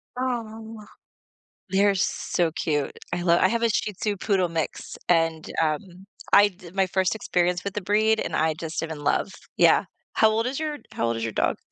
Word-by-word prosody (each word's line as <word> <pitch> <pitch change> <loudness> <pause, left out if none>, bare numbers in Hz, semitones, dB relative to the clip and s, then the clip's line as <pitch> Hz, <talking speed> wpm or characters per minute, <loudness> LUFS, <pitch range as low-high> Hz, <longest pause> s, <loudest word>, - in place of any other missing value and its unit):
Aw. 225 -3 -4 0.9
They're 200 +1 +3
so 175 -2 0
cute. 150 -3 -2
I 175 0 -1
love 170 -1 +4
I - - +5
have 235 0 -1
a 230 - +4
Shih 210 -1 0
Tzu 205 +2 -2
poodle 190 -2 +1
mix, 165 -2 -4
and, 165 -2 +2
um, 175 +5 -3 0.3
I 205 0 +8
di 180 -3 -14
my 195 0 +2
first 190 +1 +1
experience 180 -4 0
with 200 0 -4
the 210 - -2
breed, 215 +3 +2
and - - -4
I 160 0 +2
just 160 0 -4
am 165 - -4
in 155 -2 -6
love. 190 - +1 0.2
Yeah, - - +5 0.3
how 220 - +5
old 225 +2 0
is 265 +3 -2
your 305 -2 -3
how 115 - -1
old 115 0 0
is 115 - -4
your 115 - -3
dog? - - 0
190 Hz, 200 wpm, -25 LUFS, 165-215 Hz, 0.9 s, I